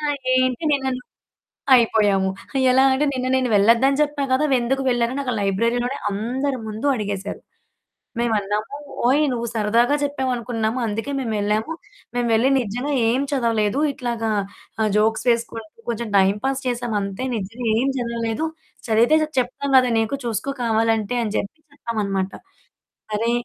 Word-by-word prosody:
"ఆ! - - -10 0.3
ఏంటి 255 +3 +1
నిన్ననువు" 265 -3 -1 0.7
అయిపోయాము. 205 -5 +3 0.4
ఎలా 260 +1 +5
అంటే, 290 +3 +1
"నిన్న 255 0 -2
నేను 255 -1 +1
వెళ్ళద్దని 235 +7 +4
జెప్పా 290 -1 0
గదా! 260 +4 +3
వెందుకు 255 +3 0
వెళ్ళారని," 240 +2 0
అక్కడ 250 -2 -1
లైబ్రరీలోనే 235 +7 0
అందరి 255 +7 -2
ముందు 215 +6 -4
అడిగేశారు. 205 -3 -4 0.8
మేవన్నామూ, 215 +1 -1 0.3
"ఓయ్ 275 +5 +4
నువ్వు 235 -1 -3
సరదాగా 230 +5 +2
చెప్పావనుకున్నాము, 245 -5 -1
అందుకే 225 +6 -3
మేమెళ్ళాము, 215 +1 -1 0.4
మేము 245 -1 0
వెళ్లి 230 +4 +4
నిజంగా 245 +5 -3 0.2
ఏం 250 +4 +1
చదవలేదు, 230 -3 +1
ఇట్లాగా 235 -3 -3 0.5
ఆహ్, 215 - +2
జోక్స్ 220 +2 +1
వేసుకుంటూ, 230 -2 -1 0.2
కొంచెం 235 0 -2
టైమ్ 195 +1 +4
పాస్ 270 0 0
చేశామంతే, 225 -4 -2
నిజంగా 225 +4 -5
ఏం 265 - +1
జదవలేదు, 235 +2 -2 0.4
చదివితే 230 +6 +4
జ - - +1
చెప్తాం 260 +3 -3
గదా 255 -1 +4
నీకు 225 +5 -1
చూసుకో 230 +4 -2
కావాలంటే" 225 0 +1
అని 215 -2 -3
జేప్పి 200 +10 -3
చెప్పామనమాట. 200 -7 -2 0.8
సరే, 220 +2 0
235 Hz, 135 wpm, -22 LUFS, 215-260 Hz, 0.8 s, ఎలా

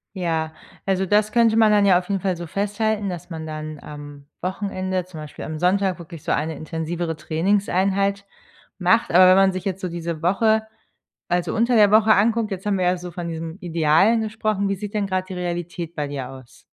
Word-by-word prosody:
Ja, 160 -3 -2 0.3
also 190 0 +1
das 210 +2 +2
könnte 230 -1 +4
man 220 -1 +5
dann 205 -1 +4
ja 185 -2 +5
auf 180 - -11
jeden 195 - 0
Fall 190 -2 0
so 170 0 -7
festhalten, 205 +2 -1
dass 175 0 -7
man 160 -2 -6
dann 155 -1 -6
am 145 -1 -10 0.2
Wochenende, 185 -1 -2
zum 180 -3 -10
Beispiel 150 -1 -8
am 155 -1 -5
Sonntag, 185 0 +1
wirklich 165 -2 -10
so - - -2
eine 155 +2 -1
intensivere 165 +1 -4
Trainingseinheit 195 +4 0 0.5
macht. 195 +6 +3
Aber 185 +2 +7
wenn 185 - +7
man 195 -1 +4
sich 185 - -5
jetzt 190 -1 -3
so 185 - -2
diese 170 -2 -5
Woche, 220 +5 +3 0.7
also 175 -1 0
unter 235 +2 +2
der 210 -2 +6
Woche, 220 0 +6
anguckt, 225 +2 +2
jetzt 195 0 -6
haben 200 -2 +1
wir 180 - +1
ja 180 +1 +2
so 175 0 -8
von 175 0 -5
diesem 165 +1 -5
Idealen 170 +6 +3
gesprochen: 215 -2 -1
Wie 195 - 0
sieht 205 +2 -7
denn 205 -2 0
gerade 185 -1 -2
die 185 - -6
Realität 175 -1 -4
bei 145 -2 -3
dir 135 -3 -5
aus? 130 -2 -14
185 Hz, 205 wpm, -22 LUFS, 165-200 Hz, 0.7 s, Aber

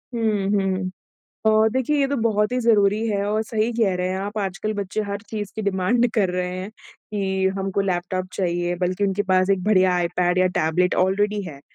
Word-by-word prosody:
हुँ, 215 -4 0
हुँ। 190 -2 0 0.6
अ, 220 0 +5
देखिए 260 +4 0
ये 275 - +3
तो 285 - -1
बहुत 210 0 +1
ही 250 - +1
ज़रूरी 215 -2 +3
है 200 -2 0
और 215 +1 0
सही 220 0 -1
कह 220 -5 +1
रहे 180 0 -1
हैं 185 - -2
आप 205 +2 -4
आजकल 200 +2 -2
बच्चे 200 +1 -3
हर 200 0 -3
चीज़ 205 -2 -5
की 220 - -3
डिमांड 200 +5 +1
कर 205 -5 +2
रहे 180 0 -2
हैं 190 +3 -6
कि 195 -3 -4
हमको 195 0 -1
लैपटॉप 185 -1 -2
चाहिए 175 -1 -1
बल्कि 185 +2 -1
उनके 200 +1 0
पास 185 +1 +3
एक 195 -2 +1
बढ़िया 185 -3 +4
आईपैड 175 +1 +1
या 185 - +4
टैबलेट 175 +3 +1
ऑलरेडी 205 +2 0
है। 155 -7 -9
195 Hz, 200 wpm, -22 LUFS, 185-215 Hz, 0.6 s, अ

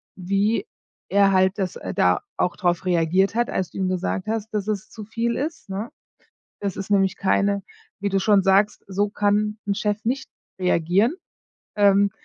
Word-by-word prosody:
wie 200 - 0 0.4
er 200 0 +4
halt 190 0 +3
das 190 -3 -2
äh, - - -6
da - - +3 0.2
auch 180 - 0
drauf 175 -2 0
reagiert 180 +3 +2
hat, 240 +1 +1
als 185 -3 -2
du - - -10
ihm 190 -1 0
gesagt 185 +1 -2
hast, 220 0 -3
dass 210 -1 -2
es 215 0 -3
zu 215 -2 -9
viel 230 +2 -1
ist, 305 -3 -4
ne? 200 +4 -4 0.7
Das 200 -2 -2
ist 195 0 -6
nämlich 195 -2 +3
keine 200 +1 +1 0.4
wie 200 - 0
du 195 0 +1
schon 200 0 +4
sagst, 200 +2 +3
so 200 +1 0
kann 210 +1 +1
'n 200 - +1
Chef 210 0 -1
nicht 260 +4 -1 0.3
reagieren. 185 - +2 0.6
Ähm, 200 -1 +4
200 Hz, 175 wpm, -23 LUFS, 190-210 Hz, 0.7 s, er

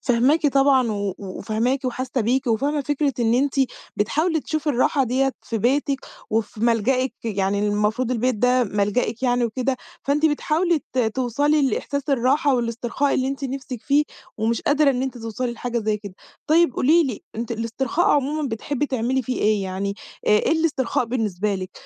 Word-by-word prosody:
فاهماكِ 265 +6 +3
طبعًا 270 -4 +3
و 200 -2 -2
وفاهماكِ 225 +7 -2
وحاسّة 255 0 -2
بيكِ، 255 +5 +1
وفاهمة 280 +6 +1
فكرة 285 0 0
إن 230 0 +3
أنتِ 275 +2 +1 0.4
بتحاولي 315 - +1
تشوفي 310 0 -3
الراحة 265 +2 +2
ديّة 265 +3 +1
في 225 - -3
بيتِك، 275 +4 +1 0.3
وفي 215 -1 -2
ملجئِك. 245 +3 +2
يعني 200 -2 0
المفروض 210 +4 0
البيت 250 0 +1
ده 250 +3 +3
ملجئِك 210 +3 -1
يعني 245 -1 +2
وكده، 255 +3 -1 0.3
فأنتِ 295 +3 +2
بتحاولي 315 +3 +1
ت 260 - -2
توصَلي 260 +6 +1
لإحساس 280 0 -2
الراحة 275 +2 +2
والاسترخاء 240 +3 -1
اللي 260 0 0
أنتِ 275 +1 -4
نِفسِك 260 -3 -5
فيه، 290 +1 +3 0.3
ومش 225 +1 0
قادرة 290 0 +3
إن 255 -1 -1
أنتِ 265 -2 -4
توصَلي 230 +2 -3
لحاجة 240 0 -3
زي 215 -1 0
كده. 200 -3 -10 0.3
طيب، 330 -1 +4
قولي 320 +6 +4
لي، 245 -6 -4
أنتِ 235 +1 -3
الاسترخاء 235 +8 -1
عمومًا 290 +1 +1
بتحبّي 270 +5 -2
تعملي 260 0 0
في 255 - -3
إيه 210 -1 +2
يعني، 195 +1 -3 0.3
آآ - - +3
إيه 210 +8 +4
الاسترخاء 300 -7 +1
بالنسبة 210 -4 -1
لِك، 185 -1 -5
255 Hz, 165 wpm, -22 LUFS, 225-280 Hz, 0.4 s, طيب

